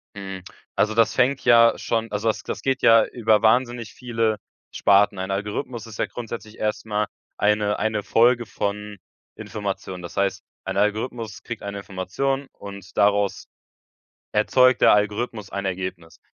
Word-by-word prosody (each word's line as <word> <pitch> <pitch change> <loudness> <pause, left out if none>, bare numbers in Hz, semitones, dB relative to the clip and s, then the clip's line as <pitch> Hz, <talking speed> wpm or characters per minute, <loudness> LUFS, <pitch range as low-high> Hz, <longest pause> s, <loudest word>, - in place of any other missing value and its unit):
Hm, 95 -2 -7 0.3
also 110 +1 +2
das 115 -1 +3
fängt 130 +2 +2
ja 115 -1 +6
schon 115 -1 -2
also 105 +2 0
das 110 - -2
das - - -5
geht 135 -1 0
ja 115 -1 +6
über 110 -3 +2
wahnsinnig 120 0 +2
viele 115 -3 -1 0.3
Sparten. 100 0 +3
Ein 95 +1 -4
Algorithmus 105 +4 -4
ist 110 - -11
ja - - +2
grundsätzlich 115 -2 -8
erst 105 0 -2
mal 105 -1 -1 0.3
eine 105 0 +1
eine 110 -1 0
Folge 120 +3 +3
von 105 0 -4 0.4
Informationen. 100 -4 -5
Das 85 - -9
heißt, 100 -1 0 0.2
ein - - -4
Algorithmus 110 +1 -2
kriegt 120 -2 -7
eine 100 0 -5
Information 115 +9 -3
und 100 -2 -11
daraus 100 -1 +2 0.9
erzeugt 125 +4 +4
der - - +7
Algorithmus 105 0 -1
ein 100 0 -4
Ergebnis. 95 -3 -5
105 Hz, 150 wpm, -23 LUFS, 100-115 Hz, 0.9 s, der